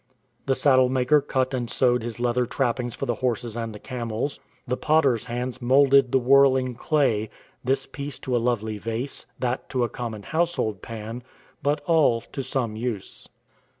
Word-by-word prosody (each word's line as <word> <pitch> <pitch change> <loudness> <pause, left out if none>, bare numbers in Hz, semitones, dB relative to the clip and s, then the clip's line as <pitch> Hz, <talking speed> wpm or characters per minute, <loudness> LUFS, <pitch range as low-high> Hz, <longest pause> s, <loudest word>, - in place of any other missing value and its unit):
The 135 - +3
saddle 130 -3 +4
maker 130 +3 +3
cut 130 -2 -1
and 120 -2 -2
sewed 125 -1 +2
his 115 0 -6
leather 120 0 +1
trappings 120 -2 -1
for - - -3
the 120 - 0
horses 120 -2 -1
and 115 -1 -3
the 105 - -8
camels. 120 +2 -4 0.3
The 125 - 0
potter's 140 -6 +2
hands 125 +1 -4
moulded 135 +1 +5
the - - +4
whirling 130 0 +4
clay 120 -5 +1 0.2
— - - -35
this 130 +2 0
piece 140 -1 -6
to 125 - -1
a 120 - +2
lovely 110 -3 -1
vase, 115 +6 -4
that 125 0 -2
to 125 -2 0
a 120 - 0
common 110 -2 -6
household 160 - -1
pan 115 +1 -7 0.2
— - - -31
but 145 +2 0
all 145 -6 +3
to 135 - -3
some 125 -4 -2
use. 110 -3 -5
125 Hz, 180 wpm, -25 LUFS, 115-135 Hz, 0.3 s, moulded